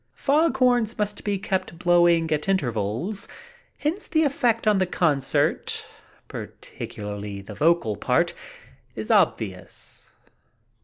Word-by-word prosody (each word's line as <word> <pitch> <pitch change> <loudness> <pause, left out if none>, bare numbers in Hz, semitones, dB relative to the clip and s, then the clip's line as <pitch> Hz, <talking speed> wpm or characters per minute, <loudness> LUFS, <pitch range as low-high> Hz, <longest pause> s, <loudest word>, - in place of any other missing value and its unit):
Fog 295 -1 +2
horns 245 -3 +2
must 210 -1 -2
be 205 -1 0
kept 190 -3 -3
blowing 175 -2 +4
at 150 +4 0
intervals, 125 - -1 0.5
hence 330 +7 -2
the 315 -1 +2
effect 245 -6 +1
on 210 -2 +4
the 185 - +1
concert, 145 -7 +1 0.4
particularly 105 -1 -7
the 100 +2 -9
vocal 150 -3 +2
part, - - +1 0.6
is - - -3
obvious. - - -1
185 Hz, 110 wpm, -24 LUFS, 140-225 Hz, 0.6 s, blowing